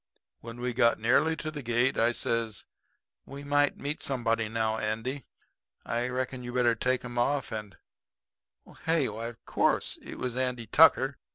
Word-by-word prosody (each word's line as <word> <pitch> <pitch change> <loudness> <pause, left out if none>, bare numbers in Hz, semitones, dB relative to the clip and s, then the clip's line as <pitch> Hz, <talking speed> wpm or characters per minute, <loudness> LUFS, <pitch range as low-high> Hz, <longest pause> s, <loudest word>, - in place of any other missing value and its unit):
"When 115 +1 -9
we 125 0 -2
got 115 -1 +3
nearly 140 +8 +3
to 155 0 -5
the 150 -2 -6
gate, 120 +1 +1
I 115 +1 +3
says: 115 -3 -2 0.6
'We 140 +1 -8
might 145 0 +2
meet 145 +2 -4
somebody 115 -4 0
now, 110 0 0
Andy. 115 +6 -3 0.6
I 120 +1 -1
reckon 125 0 -3
you 120 - -5
better 125 -2 +3
take 125 +3 0
'em 120 0 -4
off, 135 0 0
and 105 -5 -6 0.5
' - - -22
Hey? 160 -4 +2
Why, 110 +2 -5
of 120 -1 -11
course - - +1
it - - -9
was 125 -2 -3
Andy 125 -2 -1
Tucker. - - +5
120 Hz, 170 wpm, -29 LUFS, 115-130 Hz, 0.6 s, Tucker